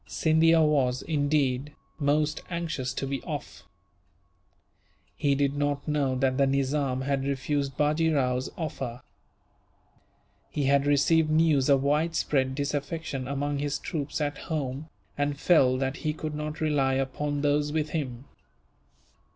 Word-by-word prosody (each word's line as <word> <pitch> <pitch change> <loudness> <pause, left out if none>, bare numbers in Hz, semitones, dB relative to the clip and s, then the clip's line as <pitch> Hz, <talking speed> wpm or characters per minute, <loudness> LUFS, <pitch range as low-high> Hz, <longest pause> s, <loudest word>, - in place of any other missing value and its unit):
Scindia 160 +1 +4
was, 130 -5 +2
indeed, 145 -2 0 0.3
most 150 +1 +1
anxious 165 -7 -3
to - - -3
be 135 0 -3
off. 150 - -7 1.5
He 140 -1 +1
did 140 0 +1
not 145 -1 -1
know 145 -3 +1
that 130 +1 +1
the 140 - +4
Nizam 135 -1 0
had 135 0 -1
refused 140 0 -2
Bajee 155 +2 +2
Rao's 130 -3 0
offer. 130 -7 -5 1.5
He 145 - -2
had 140 +1 +3
received 155 +3 +3
news 155 -3 +3
of 135 -1 +4
widespread 145 -3 +1
disaffection 145 -1 -3
among 140 +1 -2
his 145 0 -1
troops 150 -2 -4
at 145 -1 -2
home, 145 -1 -3 0.3
and 145 0 -1
felt 130 -8 +4
that 135 +1 -1
he 155 - -2
could 155 0 -5
not 150 +1 -4
rely 140 -4 +2
upon 140 +2 -2
those 145 0 +1
with 155 0 -1
him. 135 -5 -4
145 Hz, 135 wpm, -27 LUFS, 135-150 Hz, 1.5 s, Scindia